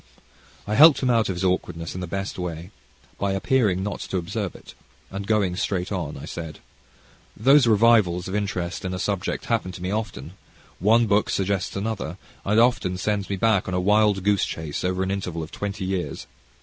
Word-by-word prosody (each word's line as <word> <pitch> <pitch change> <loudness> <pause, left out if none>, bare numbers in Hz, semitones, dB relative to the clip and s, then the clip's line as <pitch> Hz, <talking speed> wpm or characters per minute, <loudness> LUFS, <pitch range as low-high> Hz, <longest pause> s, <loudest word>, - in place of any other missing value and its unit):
I 105 - -3
helped 150 +5 +7
him 125 - +3
out 115 -3 +2
of 95 - -1
his 90 - -4
awkwardness 85 -3 -1
in 90 - -5
the 90 - -4
best 95 +2 -4
way, 85 +1 -5 0.5
by 100 -1 0
appearing 95 -3 +1
not 100 0 -3
to 95 - -3
observe 85 -2 -3
it, - - -13 0.4
and 100 +1 -5
going 100 -5 +1
straight 90 0 -2
on, 85 -8 -3
I 70 - -8
said: 80 -3 -7 0.8
"Those 135 +3 +5
revivals 105 -5 +4
of 95 - -5
interest 95 -4 -2
in 95 -1 -3
a - - -4
subject 100 0 -2
happen 115 -5 -1
to 90 - -9
me 90 - -2
often; 90 - -4 0.5
one 115 +5 +4
book 105 0 +2
suggests 95 0 -1
another, 100 -4 -3 0.3
and 105 +3 +2
often 115 -7 +2
sends 100 0 -1
me 100 - -1
back 105 0 +2
a 90 -1 -1
wild 105 0 +3
goose 100 -1 +2
chase 80 -2 -5
over 90 +1 0
an 95 - -2
interval 90 -4 -3
of 80 - -9
twenty 100 -1 -4
years. 95 -1 -3
95 Hz, 190 wpm, -24 LUFS, 90-105 Hz, 0.8 s, helped